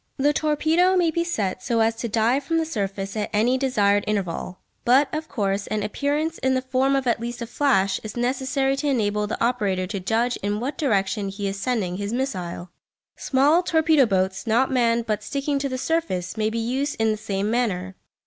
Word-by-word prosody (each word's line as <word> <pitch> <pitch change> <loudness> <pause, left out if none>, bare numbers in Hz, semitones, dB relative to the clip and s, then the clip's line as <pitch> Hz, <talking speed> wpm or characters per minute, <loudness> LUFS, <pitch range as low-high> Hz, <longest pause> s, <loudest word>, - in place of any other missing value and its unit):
The 290 +2 +2
torpedo 315 +5 +2
may 340 -2 +3
be 335 +2 0
set 205 - -2
so 235 0 0
as 225 0 +2
to 235 - -3
dive 230 +5 +1
from 330 +4 0
the 325 - +1
surface 195 -7 -3
at 210 -1 -2
any 225 +4 +2
desired 205 -6 +2
interval; 185 -3 -2 0.3
but, 265 +5 +4
of 310 +1 -4
course, 200 -5 -1
an 215 -1 -2
appearance 290 +9 -1
in 260 0 +1
the 255 - +1
form 265 +1 +1
of 270 -1 0
at 235 -1 +1
least 240 +1 -5
a 235 - -4
flash 230 -6 +1
is 215 +1 -7
necessary 265 +2 0
to 295 - -2
enable 210 -6 +1
the 215 - -4
operator 205 -7 0
to 200 +2 -4
judge 225 +6 0
in 205 +1 -2
what 270 +5 -3
direction 200 -6 0
he 200 +1 -4
is 195 0 -4
sending 200 -6 -1
his 205 +2 -3
missile. 185 -9 -3 0.4
Small 285 +6 +3
torpedo 320 -6 +3
boats, 190 +1 -1
not 240 +5 +2
manned 235 -2 +2
but 215 -2 -1
sticking 280 +6 -2
to 275 0 -2
the 255 - -3
surface, 255 - -1
may 215 -1 0
be 225 - -4
used 260 +5 -1
in 225 0 +2
the - - 0
same 205 -1 -2
manner. 190 -6 -1
235 Hz, 205 wpm, -23 LUFS, 205-275 Hz, 0.4 s, but